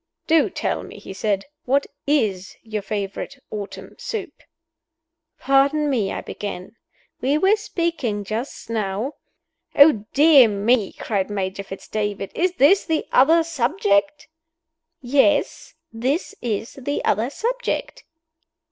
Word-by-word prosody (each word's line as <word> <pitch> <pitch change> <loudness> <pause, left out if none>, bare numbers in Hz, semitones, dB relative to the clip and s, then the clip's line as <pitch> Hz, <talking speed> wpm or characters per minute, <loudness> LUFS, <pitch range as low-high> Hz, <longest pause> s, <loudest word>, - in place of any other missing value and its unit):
"Do 325 -1 +3
tell - - -2
me," - - -11
he - - -9
said, 200 0 -1 0.2
"what 275 +2 +2 0.2
is 215 -10 0
your 215 -2 -4
favorite 200 +4 -4
autumn 205 -2 -7
soup?" 445 - -5 1.0
"Pardon 280 +2 +2
me," 220 -7 0
I - - -4
began, 200 0 -7 0.5
"we 275 +4 +2
were 385 +6 +4
speaking 335 - -2
just 220 +6 -5
now 220 +4 -2 0.3
" - - -47
"Oh, 285 -7 +6
dear 285 -4 +7
me!" 210 +1 +1
cried 200 -3 -2
Major 195 -1 -3
Fitz 195 0 -10
David. 205 -2 -3
"Is 360 +1 0
this 365 +5 +5
the 320 -2 -1
other 325 +6 +5
subject?" 300 - 0 0.8
"Yes 285 +3 +1 0.2
this 265 - -1
is 225 +2 -3
the 285 +3 -2
other 220 +5 +1
subject." - - -3
255 Hz, 125 wpm, -22 LUFS, 205-300 Hz, 1.0 s, dear